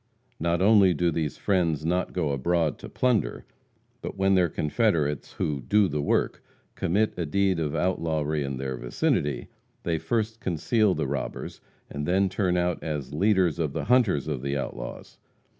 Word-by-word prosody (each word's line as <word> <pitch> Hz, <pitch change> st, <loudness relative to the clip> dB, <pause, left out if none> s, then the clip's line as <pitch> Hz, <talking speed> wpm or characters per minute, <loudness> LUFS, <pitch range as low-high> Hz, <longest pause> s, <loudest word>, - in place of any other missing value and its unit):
Not 85 Hz, +2 st, +1 dB
only 100 Hz, -4 st, +6 dB
do 85 Hz, +2 st, +1 dB
these 75 Hz, -3 st, -2 dB
"friends" 85 Hz, -6 st, +1 dB
not 90 Hz, +2 st, 0 dB
go 80 Hz, -5 st, -1 dB
abroad 80 Hz, +3 st, 0 dB
to -, -, -9 dB
plunder, 120 Hz, -, 0 dB, 0.6 s
but -, -, -6 dB
when 95 Hz, 0 st, +3 dB
their 90 Hz, -3 st, +4 dB
confederates 75 Hz, -, 0 dB
who 70 Hz, -3 st, -2 dB
"do 100 Hz, +11 st, +3 dB
the 75 Hz, -2 st, -2 dB
work" 70 Hz, -, 0 dB, 0.3 s
commit 105 Hz, +5 st, +1 dB
a 85 Hz, -, 0 dB
deed 95 Hz, +2 st, +1 dB
of 75 Hz, -3 st, -2 dB
outlawry 80 Hz, -4 st, 0 dB
in 70 Hz, -1 st, -3 dB
their 65 Hz, -1 st, -3 dB
vicinity, 65 Hz, +4 st, -1 dB, 0.4 s
they 80 Hz, -2 st, 0 dB
first 115 Hz, +1 st, -1 dB
conceal 100 Hz, +3 st, +1 dB
the 80 Hz, -, -1 dB
robbers, 70 Hz, -1 st, -4 dB, 0.3 s
and 75 Hz, +1 st, -5 dB
then 95 Hz, +2 st, +3 dB
turn 90 Hz, -1 st, 0 dB
out 90 Hz, 0 st, 0 dB
as 75 Hz, -4 st, -4 dB
leaders 95 Hz, -1 st, +2 dB
of 75 Hz, -4 st, -1 dB
the -, -, -2 dB
hunters 115 Hz, -, +3 dB
of 75 Hz, -5 st, -2 dB
the 70 Hz, +1 st, -1 dB
outlaws. -, -, -6 dB
85 Hz, 165 wpm, -26 LUFS, 75-95 Hz, 0.6 s, only